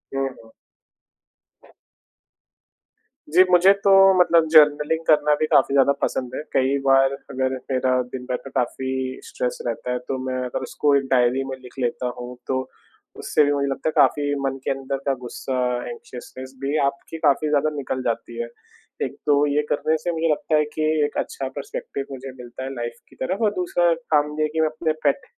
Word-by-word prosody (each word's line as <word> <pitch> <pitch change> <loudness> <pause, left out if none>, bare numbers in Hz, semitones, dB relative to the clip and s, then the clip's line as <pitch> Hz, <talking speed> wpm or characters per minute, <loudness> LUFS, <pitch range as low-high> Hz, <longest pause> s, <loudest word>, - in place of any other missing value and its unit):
हुँ, 135 0 0 0.2
हुँ। 110 - -18 2.8
जी, 185 - +8
मुझे 180 +2 +7
तो 200 - +4 0.3
मतलब 170 -2 +4
जर्नलिंग 150 0 +5
करना 150 -1 +4
भी 155 - +2
काफ़ी 135 - +4
ज़्यादा 140 0 +5
पसंद 130 0 -2
है, - - -3
कई 135 +1 +2
बार 135 0 +4 0.2
अगर 130 -1 -1 0.2
मेरा 130 0 +1 0.2
दिन 125 -1 -6
भर 125 -1 -2
में 135 - -9
काफ़ी 130 +1 -2
स्ट्रेस - - -3
रहता 125 - -3
है 125 - 0
तो 135 - -2
मैं 130 0 -2
अगर 125 - -4
उसको 145 -1 +1
एक 140 - +2
डायरी 125 +1 +3
में 130 - -3
लिख 125 - -12
लेता 125 0 -1
हूँ 125 0 -8
तो, 130 0 -2 0.5
उससे 150 - +2
भी 145 - +1
मुझे 140 -1 0
लगता 135 +3 -1
है - - -2
काफ़ी 145 -1 +3
मन 135 0 -1
के - - -1
अंदर 135 0 -3
का 140 - +2
गुस्सा 130 +2 -4 0.3
एंक्शसनेस 130 +2 -9
भी 140 +3 0
आपकी 140 +4 -4
काफ़ी 150 +2 +2
ज़्यादा 150 +1 +2
निकल 130 -2 -3
जाती 115 0 -3
है। 120 - -4 0.6
एक - - -7
तो 145 0 +4
ये 145 +1 +2
करने 155 +2 +1
से 175 +3 -3
मुझे 165 0 0
लगता 155 +1 0
है 150 - +3
कि 155 - -2 0.2
एक 145 - -5
अच्छा 135 - -3
पर्स्पेक्टिव 140 0 -5
मुझे 135 0 -7
मिलता 120 +1 -8
है 135 +1 -5
लाइफ़ 120 -1 -5
की - - -19
तरफ़ 195 - -2
और 210 - +3
दूसरा 175 -1 +2 0.2
काम 150 0 +3
ये - - +3
है 155 - +2
कि 160 - +1
मैं 160 - +3
अपने 155 0 -1
पेट 280 - +1
140 Hz, 190 wpm, -23 LUFS, 130-155 Hz, 2.8 s, जी